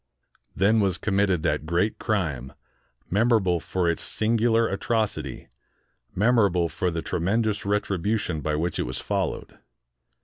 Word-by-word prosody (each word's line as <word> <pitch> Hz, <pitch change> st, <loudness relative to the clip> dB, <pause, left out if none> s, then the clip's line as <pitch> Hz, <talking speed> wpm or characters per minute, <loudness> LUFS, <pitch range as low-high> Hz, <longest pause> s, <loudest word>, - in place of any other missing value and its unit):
Then 105 Hz, +3 st, +3 dB
was 95 Hz, -4 st, +1 dB
committed 100 Hz, -4 st, +1 dB
that 75 Hz, -, -1 dB
great 90 Hz, +6 st, 0 dB
crime, 80 Hz, -, -2 dB, 0.6 s
memorable 100 Hz, -4 st, +3 dB
for 90 Hz, +1 st, -1 dB
its 85 Hz, -, 0 dB
singular 115 Hz, +1 st, +2 dB
atrocity, 110 Hz, -, -2 dB, 0.7 s
memorable 100 Hz, -5 st, +3 dB
for 95 Hz, 0 st, -1 dB
the 85 Hz, -1 st, -3 dB
tremendous 100 Hz, +3 st, -1 dB
retribution 100 Hz, -4 st, -1 dB
by 75 Hz, 0 st, -1 dB
which 85 Hz, +2 st, -2 dB
it -, -, -1 dB
was 65 Hz, -, -4 dB
followed. 100 Hz, -4 st, -3 dB
100 Hz, 125 wpm, -25 LUFS, 85-110 Hz, 0.7 s, Then